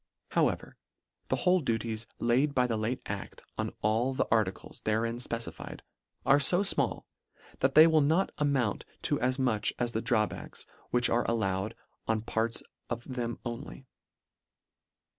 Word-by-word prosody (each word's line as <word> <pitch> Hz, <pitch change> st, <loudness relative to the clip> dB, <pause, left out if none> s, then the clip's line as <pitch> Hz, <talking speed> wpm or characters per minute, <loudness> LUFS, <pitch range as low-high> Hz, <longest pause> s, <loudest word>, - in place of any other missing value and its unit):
However, -, -, 0 dB, 0.5 s
the -, -, +1 dB
whole 185 Hz, 0 st, +3 dB
duties 115 Hz, -5 st, -2 dB
laid 130 Hz, +5 st, +2 dB
by 125 Hz, -, +4 dB
the 120 Hz, -2 st, 0 dB
late 110 Hz, +4 st, -2 dB
adt 100 Hz, -1 st, -6 dB
on -, -, -2 dB
all 115 Hz, +5 st, +2 dB
the -, -, +2 dB
articles 110 Hz, -4 st, 0 dB
therein 115 Hz, +2 st, 0 dB
fpecified, 115 Hz, -1 st, -5 dB, 0.4 s
are 140 Hz, +1 st, +6 dB
fo 175 Hz, +7 st, +4 dB
frnall, 200 Hz, -, 0 dB, 0.6 s
that 130 Hz, +1 st, +2 dB
they 155 Hz, +1 st, +10 dB
will 160 Hz, -2 st, +5 dB
not 160 Hz, +7 st, +2 dB
amount 140 Hz, -7 st, +1 dB, 0.2 s
to -, -, +1 dB
as 130 Hz, +2 st, +1 dB
much 125 Hz, -6 st, +1 dB
as 120 Hz, -1 st, 0 dB
the 110 Hz, -, -1 dB
drawbacks 110 Hz, -3 st, -1 dB, 0.2 s
which 125 Hz, -1 st, +3 dB
are 120 Hz, -, +1 dB
allowed 100 Hz, -3 st, 0 dB, 0.3 s
on 110 Hz, -1 st, +1 dB
part 115 Hz, +1 st, -1 dB, 0.3 s
of 120 Hz, -, -3 dB
them 120 Hz, -2 st, -2 dB
only. 125 Hz, +3 st, -6 dB
120 Hz, 145 wpm, -30 LUFS, 110-135 Hz, 0.6 s, they